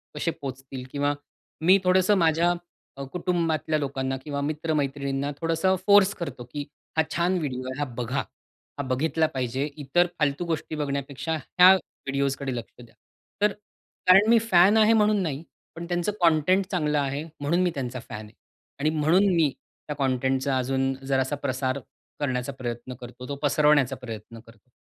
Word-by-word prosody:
कसे 165 Hz, +3 st, -1 dB
पोहोचतील 135 Hz, -2 st, -7 dB
किंवा 145 Hz, 0 st, 0 dB, 0.5 s
मी 185 Hz, +4 st, +6 dB
थोडंसं 185 Hz, +2 st, +4 dB
माझ्या 170 Hz, +1 st, +3 dB, 0.4 s
अ, 140 Hz, -, -5 dB
कुटुंबातल्या 165 Hz, -3 st, 0 dB
लोकांना 135 Hz, -1 st, -2 dB
किंवा 145 Hz, -2 st, -3 dB
मित्रमैत्रिणींना 145 Hz, -2 st, -1 dB
थोडंसं 165 Hz, +3 st, +2 dB
फोर्स 200 Hz, -1 st, +6 dB
करतो 140 Hz, -8 st, -6 dB
की 145 Hz, -1 st, -4 dB, 0.3 s
हा 160 Hz, -, +5 dB
छान 175 Hz, +2 st, +1 dB
व्हिडिओ 130 Hz, -5 st, -3 dB
आहे, 130 Hz, +2 st, -5 dB
हा 145 Hz, -, 0 dB
बघा, 125 Hz, +3 st, -1 dB, 0.5 s
हा 140 Hz, -, -2 dB
बघितला 155 Hz, +5 st, +1 dB
पाहिजे 130 Hz, +2 st, -1 dB, 0.2 s
इतर 175 Hz, +6 st, +3 dB
फालतू 150 Hz, +3 st, 0 dB
गोष्टी 160 Hz, -1 st, -3 dB
बघण्यापेक्षा 140 Hz, +1 st, -3 dB
ह्या 180 Hz, +5 st, +6 dB
व्हिडिओज 140 Hz, -6 st, -3 dB
कडे 135 Hz, -3 st, -3 dB
लक्ष 120 Hz, -, -7 dB
द्या. 120 Hz, -, -16 dB, 0.5 s
तर 210 Hz, 0 st, +4 dB, 0.6 s
कारण 195 Hz, +4 st, +7 dB
मी 230 Hz, -1 st, +6 dB
फॅन 205 Hz, -1 st, +5 dB
आहे 220 Hz, +1 st, +6 dB
म्हणून 210 Hz, -2 st, +3 dB
नाही, 150 Hz, -1 st, -3 dB, 0.3 s
पण 170 Hz, -, -6 dB
त्यांचं 175 Hz, +3 st, 0 dB
कंटेंट 170 Hz, +4 st, +4 dB
चांगलं 150 Hz, -5 st, +1 dB
आहे 140 Hz, +2 st, -2 dB, 0.2 s
म्हणून 165 Hz, +6 st, +1 dB
मी 180 Hz, -, +2 dB
त्यांचा 130 Hz, -2 st, -4 dB
फॅन 105 Hz, +1 st, -6 dB
आहे 105 Hz, -, -16 dB, 0.5 s
आणि 150 Hz, +2 st, +2 dB
म्हणून 160 Hz, +5 st, +3 dB
मी 160 Hz, -4 st, +4 dB, 0.4 s
त्या 150 Hz, -, -3 dB
कंटेंटचा 130 Hz, 0 st, 0 dB
अजून 135 Hz, +1 st, 0 dB
जरासा 135 Hz, +1 st, 0 dB
प्रसार 130 Hz, 0 st, -2 dB, 0.4 s
करण्याचा 130 Hz, -2 st, -1 dB
प्रयत्न 120 Hz, -1 st, -5 dB
करतो, 125 Hz, +1 st, -9 dB
तो 140 Hz, -, -4 dB
पसरवण्याचा 145 Hz, -2 st, +3 dB
प्रयत्न 115 Hz, -2 st, -9 dB
करतो. 115 Hz, +1 st, -20 dB
145 Hz, 155 wpm, -26 LUFS, 135-170 Hz, 0.6 s, कारण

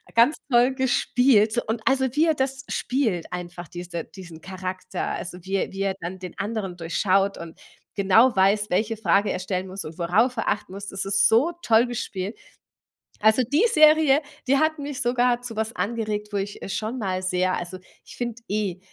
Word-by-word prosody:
Ganz 240 Hz, +7 st, +5 dB
toll 245 Hz, +1 st, +4 dB
gespielt 245 Hz, -3 st, +3 dB
und 225 Hz, +1 st, -2 dB
also, 265 Hz, 0 st, +3 dB
wie 310 Hz, +2 st, +4 dB
er 320 Hz, -, +3 dB
das 265 Hz, 0 st, -2 dB
spielt 230 Hz, -10 st, -1 dB
einfach, 175 Hz, -1 st, -6 dB
diese 175 Hz, -1 st, -6 dB
diesen 170 Hz, -4 st, -12 dB
Charakter, 185 Hz, 0 st, -5 dB
also, 180 Hz, 0 st, -5 dB
wie 190 Hz, +2 st, -3 dB
er 195 Hz, -, -1 dB
wie 195 Hz, -, -5 dB
er 195 Hz, -1 st, 0 dB
dann 180 Hz, +2 st, -6 dB
den 180 Hz, -1 st, -9 dB
anderen 205 Hz, -4 st, -3 dB
durchschaut 195 Hz, +4 st, +1 dB
und 170 Hz, -1 st, -10 dB, 0.4 s
genau 215 Hz, +6 st, +5 dB
weiß, 200 Hz, +2 st, +3 dB
welche 215 Hz, +4 st, 0 dB
Frage 205 Hz, -1 st, +2 dB
er -, -, -2 dB
stellen 185 Hz, 0 st, -3 dB
muss 190 Hz, +1 st, -6 dB
und 155 Hz, +1 st, -9 dB
worauf 210 Hz, +9 st, +2 dB
er 225 Hz, -, 0 dB
achten 195 Hz, -, -2 dB
muss. 200 Hz, +1 st, -7 dB
Das 195 Hz, 0 st, -4 dB
ist 200 Hz, +1 st, +3 dB
so 270 Hz, +10 st, +3 dB
toll 225 Hz, -3 st, +4 dB
gespielt. 210 Hz, -4 st, -4 dB, 0.8 s
Also 220 Hz, +4 st, +4 dB
die 290 Hz, -, +2 dB
Serie, 310 Hz, -, +6 dB, 0.3 s
die 275 Hz, +2 st, +4 dB
hat 315 Hz, +1 st, +1 dB
mich 285 Hz, -2 st, -5 dB
sogar 245 Hz, 0 st, +2 dB
zu 240 Hz, -2 st, -6 dB
was 220 Hz, +1 st, -3 dB
angeregt, 215 Hz, -2 st, -2 dB
wo 205 Hz, -, -1 dB
ich, 200 Hz, +1 st, -4 dB
äh, -, -, -5 dB
schon 220 Hz, +5 st, -3 dB
mal 190 Hz, -5 st, -2 dB
sehr 185 Hz, 0 st, 0 dB
also, 175 Hz, +1 st, -5 dB, 0.3 s
ich -, -, -12 dB
finde 240 Hz, -1 st, -4 dB
eh, 200 Hz, -3 st, -2 dB
210 Hz, 190 wpm, -24 LUFS, 185-245 Hz, 0.8 s, Serie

